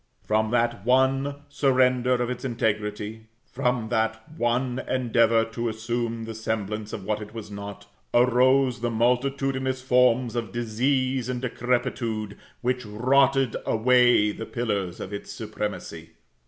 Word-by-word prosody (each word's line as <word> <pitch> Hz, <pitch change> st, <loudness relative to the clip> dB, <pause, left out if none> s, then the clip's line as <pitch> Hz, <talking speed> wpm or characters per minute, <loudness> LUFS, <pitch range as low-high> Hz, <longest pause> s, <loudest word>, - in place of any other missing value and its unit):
From 110 Hz, 0 st, +1 dB
that 120 Hz, -4 st, 0 dB
one 135 Hz, +3 st, +2 dB
surrender 130 Hz, -3 st, +2 dB
of 120 Hz, -1 st, 0 dB
its 125 Hz, 0 st, -5 dB
integrity, 110 Hz, -2 st, -2 dB, 0.2 s
from 125 Hz, -3 st, -1 dB
that 110 Hz, -1 st, -1 dB
one 125 Hz, 0 st, 0 dB
endeavor 115 Hz, -3 st, +3 dB
to 115 Hz, +1 st, -3 dB
assume 115 Hz, +1 st, -3 dB
the 115 Hz, 0 st, -6 dB
semblance 110 Hz, -1 st, -3 dB
of 100 Hz, -, -6 dB
what 105 Hz, +1 st, -1 dB
it 105 Hz, +1 st, -9 dB
was 105 Hz, -2 st, -7 dB
not, 100 Hz, 0 st, -8 dB, 0.3 s
arose 125 Hz, +1 st, +3 dB
the 120 Hz, -, 0 dB
multitudinous 130 Hz, +2 st, 0 dB
forms 125 Hz, -2 st, +3 dB
of 115 Hz, -2 st, -3 dB
disease 130 Hz, +2 st, 0 dB
and 125 Hz, -1 st, -2 dB
decrepitude, 120 Hz, -4 st, -2 dB, 0.3 s
which 125 Hz, +1 st, -1 dB
rotted 130 Hz, +3 st, +2 dB
away 120 Hz, -2 st, +4 dB
the 115 Hz, +2 st, -7 dB
pillars 100 Hz, -7 st, -2 dB
of 95 Hz, -, -6 dB
its 100 Hz, -, -6 dB
supremacy. -, -, -6 dB
120 Hz, 130 wpm, -25 LUFS, 110-125 Hz, 0.3 s, away